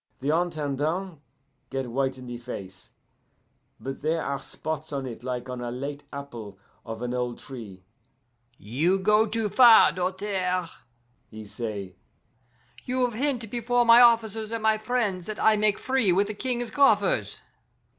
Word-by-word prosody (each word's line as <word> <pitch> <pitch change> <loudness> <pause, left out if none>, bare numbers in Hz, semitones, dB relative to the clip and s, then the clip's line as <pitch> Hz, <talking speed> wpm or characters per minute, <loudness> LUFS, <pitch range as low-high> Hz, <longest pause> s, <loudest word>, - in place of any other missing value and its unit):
The 145 +4 +1
Intendant 160 +1 -2 0.5
get 135 -3 -4
white 135 +1 -1
in 130 - -10
the 120 -1 -6
face, 95 -6 -9 0.9
but 135 0 -6
there 160 +2 0
are 140 0 -2
spots 155 -1 -5
on 140 -2 -3
it 120 -3 -7
like 125 0 -4
on 125 -1 -5
a 120 - -4
late 140 +4 -6
apple 120 -8 -8 0.3
of 115 0 -7
an 125 0 -2
old 125 -1 -2
tree. 110 -9 -10 0.7
'You 150 - 0
go 210 +3 +3
too 220 0 -1
far, 230 +2 +7
Doltaire,' 185 -1 -2 0.6
he 110 -1 -10
say. 100 -3 -6 0.9
'You 255 0 0
have 245 - -3
hint 245 -1 -1
before 240 0 +1
my 230 +1 +8
officers 225 -2 +3
and 230 -1 -4
my 220 0 +3
friends 215 -6 -1
that 215 0 -5
I 220 0 +5
make 210 -1 +2
free 260 -7 +1
with 195 +3 +3
the - - -3
King's 245 +1 -3
coffers. 205 - +2
170 Hz, 155 wpm, -26 LUFS, -, 0.9 s, my